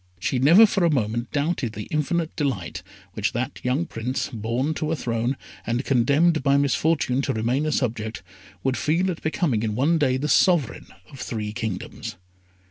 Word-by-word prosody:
She 125 +7 -1
never 170 - +8
for 200 -3 0
a 170 - +4
moment 120 -4 -1
doubted 145 -6 -1
the 105 - -6
infinite 160 +2 -1
delight 110 - -2 0.3
which 110 -1 -1
that 130 +4 -3
young 130 +7 0
Prince, 125 -2 -3
born 120 +7 -1
to 155 0 -2
a - - +1
throne, 120 0 -1 0.3
and 120 +3 -2
condemned 145 +6 +3
by 140 0 +3
misfortune 140 -1 +1
to - - -1
remain 120 +7 0
a - - 0
subject, 115 -5 -2 0.4
would 130 -1 0
feel 175 +5 +1
at 165 - -7
becoming 155 - 0
in 110 -2 -2
one 155 +7 +2
day 130 -3 +2
the 145 +3 -2
sovereign 165 - +2 0.2
of 135 - -12
three 105 -4 -4
kingdoms. 110 -4 -5
135 Hz, 175 wpm, -24 LUFS, 115-155 Hz, 0.4 s, never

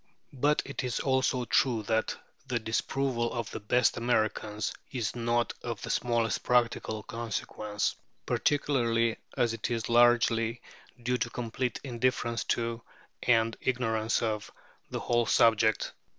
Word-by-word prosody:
But 145 +3 +2
it 140 -1 -4
is 125 -2 -1
also 130 -2 +1
true 120 -3 +2
that 110 +1 0 0.3
the 125 -2 0
disapproval 120 +2 -1
of 115 -3 -4
the - - -5
"best 120 +5 +2
Americans" 110 -3 0 0.2
is 120 -6 -2
not 120 0 0
of 115 -4 -4
the - - -2
smallest 115 -3 +1
practical 120 -3 +1
consequence, 110 -2 -3 0.3
particularly 115 -6 +1 0.2
as 120 -2 +2
it 115 - -3
is 115 -2 -2
largely 120 -1 +4 0.4
due 125 +1 0
to 120 - -1
complete 120 +1 -3
indifference 120 -2 0
to, 115 0 -1 0.4
and 115 -1 +3
ignorance 115 -3 0
of, 105 -2 -2 0.4
the - - -4
whole 120 -1 +1
subject. 110 -1 +3
115 Hz, 130 wpm, -29 LUFS, 110-125 Hz, 0.4 s, largely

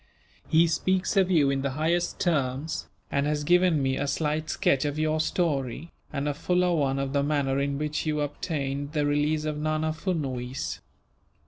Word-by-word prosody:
He 165 +1 +5
speaks 185 +4 0
of 190 -2 +4
you 150 -6 +4
in 135 0 0
the 140 - -1
highest 170 +3 0
terms, 145 -2 -1 0.2
and 140 +1 +1
has 150 0 0
given 175 -2 +3
me 130 0 +1
a 145 - -1
slight 155 +2 -1
sketch 135 -2 +2
of 145 0 -2
your 155 0 +1
story, 155 -2 -1 0.2
and 145 -1 -2
a 145 - 0
fuller 180 +4 +1
one 140 -4 +1
of 135 0 -2
the 140 - +2
manner 140 -2 +1
in 140 0 -1
which 150 +1 -2
you 150 -1 0
obtained 145 -1 -3
the 150 -2 +1
release 150 +1 +1
of 150 -1 -2
Nana 155 +1 0
Furnuwees. 135 -7 -3
150 Hz, 180 wpm, -27 LUFS, 140-160 Hz, 0.2 s, He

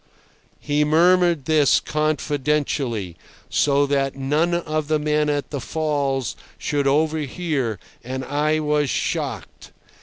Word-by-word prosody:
He 150 0 +1
murmured 170 0 +3
this 155 -2 +4
confidentially, 145 - -1 0.3
so 145 0 +3
that 135 -1 0
none 150 +6 +1
of 155 -3 -2
the 155 0 +2
men 150 0 +1
at 145 -1 -2
the 140 -3 -3
falls 140 - -1 0.2
should 145 -1 -1
overhear, 150 - 0 0.3
and 130 +2 -5
I 150 +3 +1
was 150 -2 +1
shocked. - - -3
150 Hz, 115 wpm, -22 LUFS, 135-155 Hz, 0.3 s, this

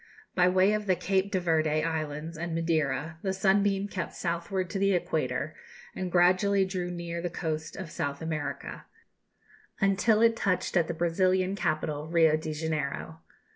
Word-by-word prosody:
By 180 -1 +4
way 185 +3 +4
of 210 -1 -2
the 185 - +4
Cape 190 +2 0
de 190 - +1
Verde 155 -3 +1
Islands 160 0 -3
and 165 +1 -4
Madeira, 160 -1 -1
the 190 -1 -1
Sunbeam 195 +1 +2
kept 185 -3 -5
southward 175 +2 -2
to 195 - -2
the 195 0 +3
Equator, 175 - -1 0.4
and 185 -1 -3
gradually 185 +3 +4
drew 185 -2 -3
near 170 -1 -4
the 175 - -2
coast 155 -2 -4
of 185 -5 -7
South 140 -3 -3
America, 160 -2 -4 0.9
until 200 +3 +3
it 230 0 +5
touched 195 -5 -1
at 170 -3 +3
the 170 - -3
Brazilian 185 +3 +1
capital, 155 -4 -1
Rio 165 -2 +4
de 155 0 -4
Janeiro. 155 0 -3
175 Hz, 160 wpm, -28 LUFS, 160-190 Hz, 0.9 s, it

